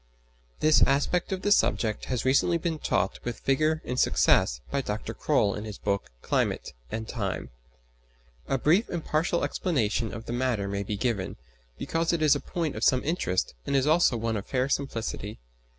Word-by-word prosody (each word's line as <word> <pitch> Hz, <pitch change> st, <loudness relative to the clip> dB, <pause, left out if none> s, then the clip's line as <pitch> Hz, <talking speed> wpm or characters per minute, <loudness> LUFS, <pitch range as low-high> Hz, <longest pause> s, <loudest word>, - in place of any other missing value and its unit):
This 155 Hz, 0 st, +5 dB
aspect 145 Hz, +7 st, +1 dB
of 190 Hz, -1 st, -3 dB
the 205 Hz, -, +1 dB
subject 110 Hz, -, +2 dB
has 125 Hz, -2 st, -2 dB
recently 140 Hz, +6 st, +3 dB
been 165 Hz, -2 st, -2 dB
taught 95 Hz, -, 0 dB
with 120 Hz, -2 st, -5 dB
vigour 155 Hz, +4 st, +1 dB
and 125 Hz, +1 st, -2 dB
success -, -, +3 dB
by 140 Hz, -, 0 dB
Dr. 105 Hz, -4 st, -4 dB
Croll 100 Hz, -, +1 dB
in 105 Hz, -, -5 dB
his 105 Hz, -2 st, -7 dB
book 100 Hz, -1 st, -2 dB
"Climate -, -, -1 dB, 0.2 s
and 110 Hz, -, -4 dB
Time." 100 Hz, -7 st, -4 dB, 1.0 s
A 135 Hz, -, +1 dB
brief 170 Hz, -, +3 dB
and 170 Hz, -2 st, -4 dB
partial 165 Hz, +3 st, 0 dB
explanation 115 Hz, -, 0 dB
of 115 Hz, 0 st, -7 dB
the -, -, -4 dB
matter 120 Hz, -5 st, 0 dB
may 100 Hz, 0 st, -2 dB
be 100 Hz, +1 st, -3 dB
given, 105 Hz, -5 st, -1 dB, 0.4 s
because 165 Hz, +1 st, -1 dB
it 165 Hz, -2 st, 0 dB
is 150 Hz, -1 st, +5 dB
a -, -, -1 dB
point 165 Hz, -3 st, -3 dB
of 110 Hz, -, -4 dB
some 130 Hz, +1 st, +3 dB
interest 145 Hz, -, -1 dB
and 140 Hz, -, 0 dB
is 135 Hz, -1 st, +3 dB
also 155 Hz, -5 st, +4 dB
one 115 Hz, -1 st, -1 dB
of 100 Hz, -, -6 dB
fair 130 Hz, 0 st, 0 dB
simplicity. 115 Hz, -6 st, -3 dB
130 Hz, 180 wpm, -27 LUFS, 110-155 Hz, 1.0 s, This